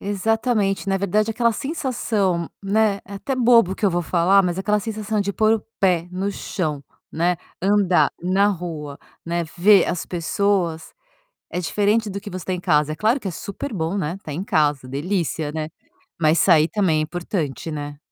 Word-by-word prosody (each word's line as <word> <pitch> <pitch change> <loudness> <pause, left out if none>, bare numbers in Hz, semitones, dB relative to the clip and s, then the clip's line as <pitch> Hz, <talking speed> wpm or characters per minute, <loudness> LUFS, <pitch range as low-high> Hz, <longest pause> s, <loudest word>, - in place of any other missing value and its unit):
Exatamente, 205 0 0
na 195 - +2
verdade 210 +3 +1
aquela 235 0 +2
sensação, 215 - -1
né, 205 0 +2
é 200 - -9
até 265 +7 -3
bobo 235 -6 +5
o - - -3
que 210 - +1
eu 195 - +3
vou 175 0 0
falar 185 +4 +3
mas 175 0 -1
aquela 210 +2 +1
sensação 215 -1 -2
de 200 0 -1
pôr 220 +2 +3
o 220 - -4 0.2
pé 180 -3 +2
no 190 +2 -2
chão, 155 -9 -3 0.3
né, 175 +2 +1 0.3
andar 195 -2 +3
na 190 +3 +2
rua, 160 -6 -5 0.3
né, 170 0 -1
ver 195 +1 +6
as 175 - -2
pessoas, 175 -1 -1 0.6
é 180 - -3
diferente 210 +4 +1
do 200 +1 -4
que 205 +1 -9
você 180 -2 -7
tem 185 -1 -1
em - - -6
casa, 150 -4 +2
é - - -3
claro 225 - +2
que 200 - -6
é - - -2
super 200 - -6
bom, 165 +2 -2
né, 170 -2 -2
estar 155 - -7
em 175 +6 -3
casa, 145 -7 +1
delícia, 155 +1 -2
né. 155 0 -3 0.5
Mas 155 +1 +3
sair 160 -3 +5
também 180 -7 +1
é - - +1
importante, 165 -2 -3
né. 145 -1 -5
190 Hz, 190 wpm, -22 LUFS, 165-205 Hz, 0.6 s, ver